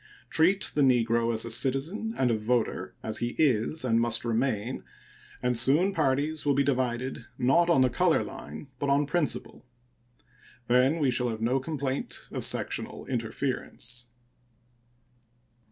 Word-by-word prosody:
Treat 185 +4 +3
the 150 - +1
negro 115 -3 +3
as 110 0 0
a 115 - -3
citizen 140 - 0
and 125 -2 +2
a - - +2
voter, 110 +2 -1
as 110 0 -2
he 120 0 -3
is 135 0 +2
and 115 -2 +2
must 120 0 0
remain, 115 0 -1 0.6
and 125 0 +1
soon 145 +11 +3
parties 150 0 0
will 145 -2 +2
be 140 - +3
divided, 130 -2 -1
not 145 +7 +3
on 165 -6 +4
the 130 - +4
color - - +2
line, 75 - -9
but 140 - -1
on 140 +1 +3
principle. 150 +1 -2 1.0
Then 125 +5 +3
we 140 -5 +2
shall 125 0 0
have 110 -1 -4
no 125 +4 +2
complaint 140 -2 -4
of - - -3
sectional - - -2
interference. 120 0 -4
130 Hz, 145 wpm, -28 LUFS, 120-145 Hz, 1.0 s, on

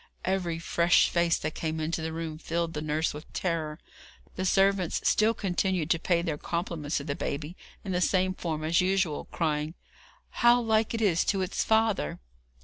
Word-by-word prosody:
Every 180 -3 0
fresh 170 +1 +3
face 170 -1 +2
that 155 0 -4
came 160 -1 -3
into 160 +1 -2
the 160 0 -3
room 160 -1 -5
filled 165 0 -2
the 150 - -3
nurse 155 +1 0
with 150 +2 -10
terror. 160 -4 -2 0.6
The 185 - -2
servants 195 -1 +2
still 220 +2 +3
continued 185 -4 0
to 165 - +3
pay 170 0 +1
their 155 -4 -2
compliments 170 -3 -2
to 140 - -3
the 140 -1 -2
baby 150 +4 -4 0.3
in 195 - -4
the 180 0 0
same 185 0 +2
form 160 -4 -4
as 165 +3 +3
usual, 185 -4 0
crying: 155 0 -2 0.6
'How 240 0 +5
like 225 -1 +1
it 225 - -2
is 180 -5 +3
to 195 -2 +1
its 185 - -1
father!' 220 - +1
170 Hz, 180 wpm, -28 LUFS, 155-190 Hz, 0.6 s, How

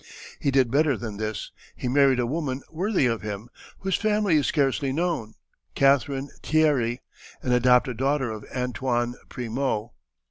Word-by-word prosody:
He 140 - 0
did 130 -3 +3
better 145 -2 +3
than 110 -3 -6
this, 110 0 -4 0.2
he - - -4
married 135 0 +4
a 120 - +2
woman 135 -1 -2
worthy 185 -1 +1
of 115 -2 0
him, 105 +2 -6 0.3
whose 190 -1 0
family 210 -5 +2
is 145 - +1
scarcely 140 -2 +1
known, 160 -8 -2 0.4
Catherine 140 0 +2
Tierry, 140 -7 +2 0.4
an 125 - -1
adopted 125 0 +4
daughter 135 -1 +1
of 110 -1 -7
Antoine 125 -1 -1 0.2
Primot. 120 -2 -2
130 Hz, 145 wpm, -25 LUFS, 120-145 Hz, 0.4 s, married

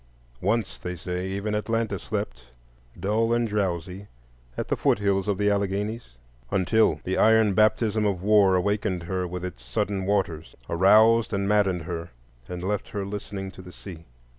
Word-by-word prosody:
Once, 105 0 -1
they 90 0 -5
say, 90 +1 -4
even 100 +2 -3
Atlanta 115 +1 -1
slept - - -4 0.5
dull 110 +3 +1
and 120 0 +1
drowsy 95 -2 -2 0.5
at - - -3
the - - +2
foot - - +2
hills 100 -1 0
of 100 -2 0
the 105 0 +1
Alleghanies, 100 - -2 0.3
until 95 - +2
the 95 - -1
iron 110 -2 +5
baptism 110 +1 +2
of 95 -3 -2
war 100 -2 +5
awakened 95 -1 0
her 90 +1 -2
with 90 +1 -5
its 85 -9 -8
sullen 95 +10 -2
waters, 85 -6 -1
aroused 110 +6 +5
and 100 0 0
maddened 100 -5 +2
her, 85 0 -5 0.4
and 90 0 -5
left 100 +1 -2
her 100 -2 -4
listening 100 -1 -6
to 95 - -12
the 90 0 -11
sea. 85 -4 -11
100 Hz, 165 wpm, -25 LUFS, 90-105 Hz, 0.5 s, iron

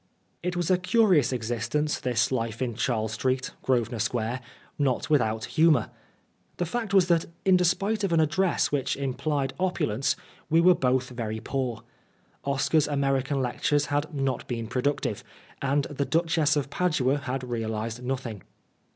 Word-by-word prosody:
It 180 0 -2
was 175 0 0
a 180 - +4
curious 185 - +3
existence, 120 +5 -1
this 120 -1 +1
life 115 -3 -2
in 125 -2 -1
Charles 110 -2 -1
Street, 130 +3 -1
Grosvenor 120 -3 0
Square, 120 +2 -1 0.4
not 140 +1 0
with 150 -4 +5
out 110 0 -1
humour. 160 -1 +3 0.7
The 175 - 0
fact 225 +5 -3
was 190 -3 +5
that, 170 -2 +3 0.2
in 190 -1 +6
despite 195 +4 +1
of 195 - 0
an 165 - +3
address 170 +4 +2
which 145 -3 0
implied 135 +1 -1
opulence, 140 - 0 0.3
we 165 +1 +4
were 180 +2 +7
both 130 -4 +1
very 110 -3 -4
poor. 125 -3 -3 0.6
Oscar's 140 +2 +2
American 135 -1 0
lectures 145 +4 +1
had 145 +1 0
not 135 -3 -2
been 115 -2 -3
productive, 125 +5 -1 0.4
and 140 +1 +1
the 140 0 -2
Duchess 160 -2 +2
of 140 -1 -2
Padua 145 -7 +1
had 135 -1 -4
realised 115 0 -3
nothing. 125 -5 -4
135 Hz, 150 wpm, -27 LUFS, 120-160 Hz, 0.7 s, were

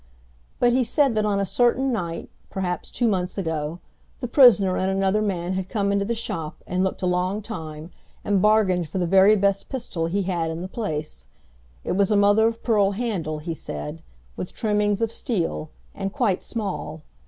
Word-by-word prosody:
But 240 0 +4
he 255 +1 +3
said 275 +1 +2
that 215 -1 +1
on 200 -1 +1
a 200 - +1
certain 245 +5 +2
night, 170 -6 -4 0.2
perhaps 180 -2 -3
two 240 - 0
months 185 -3 -1
ago, 160 -3 -2 0.4
the 245 - -3
prisoner 225 -8 +6
and 185 - 0
another 195 +2 +1
man 185 -3 -1
had 190 0 -3
come 200 -3 0
into 200 0 +1
the 235 +3 -1
shop 165 -8 -5
and 185 +1 0
looked 190 0 -2
a - - +2
long 180 +3 0
time 160 -6 -7 0.3
and 200 -2 +2
bargained 190 -6 +3
for 175 - -4
the 180 - +1
very 195 +4 +6
best 200 -1 +1
pistol 185 -11 -3
he 195 +4 0
had 175 -3 -1
in 160 +2 -4
the - - -4
place. 155 - -5 0.6
It - - -3
was 195 +1 +2
a 210 - +3
mother 205 +2 +5
of 230 0 -4
pearl 205 -4 +3
handle, 195 -9 -2
he 165 +2 -4
said, 75 - -6 0.3
with 180 - -6
trimmings 210 0 +1
of 225 - 0
steel, 180 - -2 0.2
and 195 -1 -4
quite 210 -7 0
small. 160 -8 -5
195 Hz, 190 wpm, -24 LUFS, 175-215 Hz, 0.6 s, prisoner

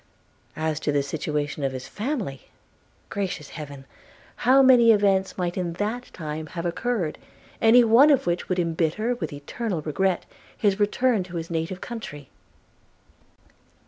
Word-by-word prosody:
As 155 -1 -1
to 155 - -1
the 145 -1 +1
situation 150 0 -3
of 135 -1 0
his 130 0 -6
family 210 - -4 0.3
– - - -37
Gracious 190 -7 -3
Heaven! 140 -3 -9 0.5
how 265 +3 +5
many 245 -3 +7
events 195 -3 +2
might 175 -1 -2
in 175 -2 -2
that 215 +7 -3
time 155 -1 -5
have 170 - -3
occurred, 180 -2 -2 0.4
any 230 +2 +7
one 235 +6 +6
of 280 -3 +3
which 175 0 -1
would 185 - 0
embitter, 170 +7 0
with 240 - -5
eternal 160 +5 -4
regret, 180 +4 0 0.3
his 205 -1 +1
return 220 +2 +2
to 180 -1 -10
his 165 0 -5
native 165 +3 -3
country. 145 - -7
180 Hz, 145 wpm, -25 LUFS, 155-225 Hz, 0.5 s, many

